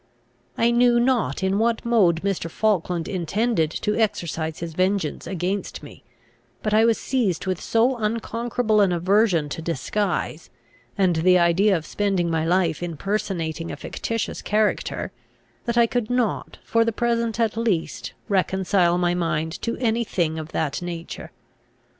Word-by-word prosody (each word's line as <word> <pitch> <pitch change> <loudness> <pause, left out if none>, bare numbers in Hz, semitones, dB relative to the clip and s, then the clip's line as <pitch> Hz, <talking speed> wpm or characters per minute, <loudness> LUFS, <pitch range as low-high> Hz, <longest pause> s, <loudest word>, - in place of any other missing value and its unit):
I 235 +1 +3
knew 240 0 +4
not 240 -5 +1
in 190 +2 +1
what 230 0 +1
mode 190 -8 +3
Mr. 195 -4 -1
Falkland 180 -4 0
intended 185 0 0
to 210 +6 -2
exercise 165 -7 -1
his 165 -1 -6
vengeance 185 -2 0
against 185 +3 -3
me; - - -12 0.6
but 215 - 0
I 220 +1 +5
was 230 -1 +3
seized 220 -11 -1
with 185 -2 -2
so 240 +3 +2
unconquerable 230 0 0
an 195 -3 +3
aversion 180 -2 +2
to 165 - -5
disguise, 170 +1 -2 0.5
and 185 -4 +3
the 180 +3 +5
idea 180 +3 +4
of 160 - -7
spending 195 -5 0
my 160 -1 +1
life 170 -1 +1
in 170 -3 -4
personating 165 -4 -2
a - - -4
fictitious 230 -1 -4
character, 210 0 0 0.5
that 235 0 -1
I 235 - +6
could 240 -1 -2
not, 245 -3 -1
for 230 0 +2
the 230 - 0
present 235 0 -1
at 225 -2 +1
least, 220 -8 -1
reconcile 190 -3 +2
my 175 0 +1
mind 165 -2 -2
to 230 - -2
any 235 -1 +1
thing 165 -7 -1
of 160 0 -7
that 150 0 -1
nature. 170 -1 -6
195 Hz, 155 wpm, -23 LUFS, 170-225 Hz, 0.6 s, I